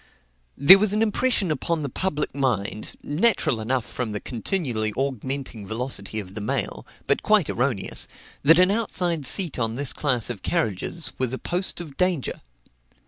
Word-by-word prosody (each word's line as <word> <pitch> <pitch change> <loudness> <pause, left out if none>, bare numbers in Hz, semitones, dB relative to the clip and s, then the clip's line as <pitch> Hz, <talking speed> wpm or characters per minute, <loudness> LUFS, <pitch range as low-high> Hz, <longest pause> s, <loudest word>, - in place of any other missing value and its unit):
There 180 +8 +9
was 210 0 +2
an 215 +1 +2
impression 215 -4 +1
upon 155 +2 -1
the - - -2
public 150 +2 -2
mind, 110 -6 -2
natural 155 - +2
enough 125 +2 -1
from 120 -4 -4
the 105 - -3
continually 120 - -2
augmenting 130 -4 -3
velocity 110 -2 -2
of 95 -2 -8
the 105 - -6
mail, 105 - -3 0.2
but - - +1
quite - - +3
erroneous, - - -1 0.3
that 165 +4 +6
an 185 +1 +5
outside 180 - 0
seat 175 -6 +1
on 115 -1 -1
this 140 0 +1
class 125 -5 0
of 105 -6 -7
carriages 165 - -1
was 130 -1 0
a - - -2
post 180 +6 -2
of 155 -6 -9
danger. 180 -7 -1
140 Hz, 160 wpm, -24 LUFS, 115-175 Hz, 0.3 s, There